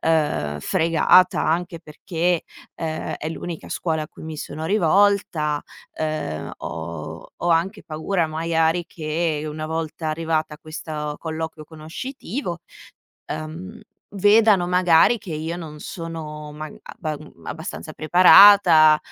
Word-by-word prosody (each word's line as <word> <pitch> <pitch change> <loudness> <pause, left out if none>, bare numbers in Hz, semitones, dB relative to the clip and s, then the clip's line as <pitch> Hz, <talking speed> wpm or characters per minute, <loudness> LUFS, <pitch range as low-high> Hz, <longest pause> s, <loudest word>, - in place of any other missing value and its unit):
ehm, 150 - 0
fregata. 175 - +3
Anche 170 0 -1
perché, 165 +2 -2 0.4
ehm, 160 -1 -3
è 155 - -4
l'unica 165 0 -6
scuola 160 -2 -2
a - - -13
cui - - -14
mi 160 -1 -7
sono 155 +2 -6
rivolta. 180 -5 +2 0.3
Ehm, 155 - -3
ho 80 -1 -7
ho 175 - -2
anche 180 +6 +1
paura 165 +3 -1
magari 165 +1 0
che 155 -2 -2
una 155 +1 -5
volta 160 0 -3
arrivata 155 -1 -1
a - - -14
questo 155 -1 -6
colloquio 160 -1 -5
conoscitivo, 170 - -6 0.7
ehm, 160 +7 -6 0.3
vedano 205 -1 +4
magari 180 +5 +4
che 175 -7 -7
io 160 +3 -4
non 155 -3 -9
sono 155 -3 -7
mag 155 +1 -8
aba 155 -3 -5
mhmm, 155 - -16
abbastanza 160 0 -6
preparata, 175 -1 +7
160 Hz, 120 wpm, -22 LUFS, 155-175 Hz, 0.7 s, preparata